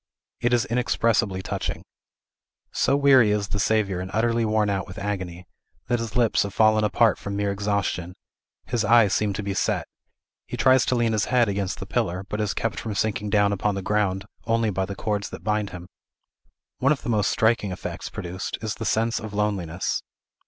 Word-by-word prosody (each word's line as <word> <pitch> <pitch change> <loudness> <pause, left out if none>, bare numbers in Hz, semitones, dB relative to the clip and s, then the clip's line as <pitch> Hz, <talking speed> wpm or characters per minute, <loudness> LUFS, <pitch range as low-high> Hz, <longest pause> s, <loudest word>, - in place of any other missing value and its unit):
It 120 - +1
is 120 +1 +3
inexpressibly 115 -6 +1
touching. - - -3 0.9
So 140 - +2
weary 135 -6 +6
is 105 -1 0
the 105 - -2
Saviour 100 -2 +1
and 95 - -5
utterly 115 +1 +2
worn 110 -1 +2
out 100 -1 -1
with 95 +2 -10
agony, 95 -4 -4 0.4
that 120 -1 +2
his 115 0 -5
lips 120 -3 +3
have 100 -1 -3
fallen 110 -1 +4
apart 110 +1 +3
from 100 0 -5
mere 100 0 0
exhaustion; 100 -3 -2 0.5
his 120 -2 -1
eyes 110 -2 +5
seem 105 +1 +1
to 105 - -4
be 100 0 -2
set; - - 0 0.6
he - - -5
tries 130 0 +4
to 125 - +2
lean 115 -2 +1
his 105 0 +1
head 125 -2 +3
against 100 -1 -2
the 95 - -5
pillar, 95 -4 -1
but 105 - -2
is 105 -2 -1
kept 115 - -2
from 110 -3 -4
sinking 105 0 -1
down 100 0 +3
upon 100 +1 0
the 95 - -4
ground 100 -2 0 0.2
only 115 -1 +2
by 95 0 -1
the 100 - -5
cords 105 0 -2
that - - -9
bind 105 -1 0
him. 90 -1 -9 0.9
One 135 +2 +3
of 150 - 0
the - - -4
most 105 -3 +2
striking 110 -3 +2
effects 90 - -6
produced 90 +1 -5
is 110 -1 -3
the 115 - -6
sense 115 +2 +1
of 110 -2 -7
loneliness. 95 -5 -1
105 Hz, 195 wpm, -24 LUFS, 100-115 Hz, 0.9 s, weary